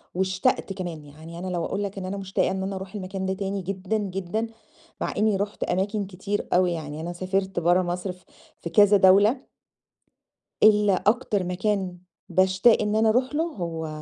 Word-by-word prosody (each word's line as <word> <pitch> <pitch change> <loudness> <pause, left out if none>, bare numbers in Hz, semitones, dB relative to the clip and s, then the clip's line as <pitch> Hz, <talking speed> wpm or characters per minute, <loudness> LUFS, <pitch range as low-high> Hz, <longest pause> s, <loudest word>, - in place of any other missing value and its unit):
واشتقت 190 +1 0
كمان، 175 -5 -6
يعني 160 +4 -11
أنا 185 - -5
لو 175 -2 -2
أقول 200 +1 -2
لك 200 0 -5
إن 185 - -4
أنا 195 +2 -4
مشتاقة 190 -1 0
إن 190 0 -2
أنا 195 +1 -3
أروح 190 +1 -7
المكان 190 -1 -4
ده 190 - 0
تاني 195 0 -3
جدًا، 190 +3 -2
جدًا، 195 +2 -3 0.5
مع - - -1
إني 215 0 +3
رُحت 205 +1 -3
أماكن 200 +2 -1
كتير 200 +2 -4
أوي 180 0 +3
يعني 155 -2 -5
أنا 175 +1 -4
سافرت 190 +1 -1
برّه 175 +2 +3
مصر 180 +1 -3
في 180 0 -16 0.4
في 170 - -5
كذا 205 +3 +6
دولة. 200 +7 +5 1.2
ال 210 -1 +6
أكتر 205 +1 +1
مكان 185 0 -1 0.3
باشتاق 190 +5 +4
إن 210 0 0
أنا 220 0 +4
أروح 255 +5 +1
له 315 - +2
هو 170 - -4
190 Hz, 180 wpm, -25 LUFS, 180-205 Hz, 1.2 s, كذا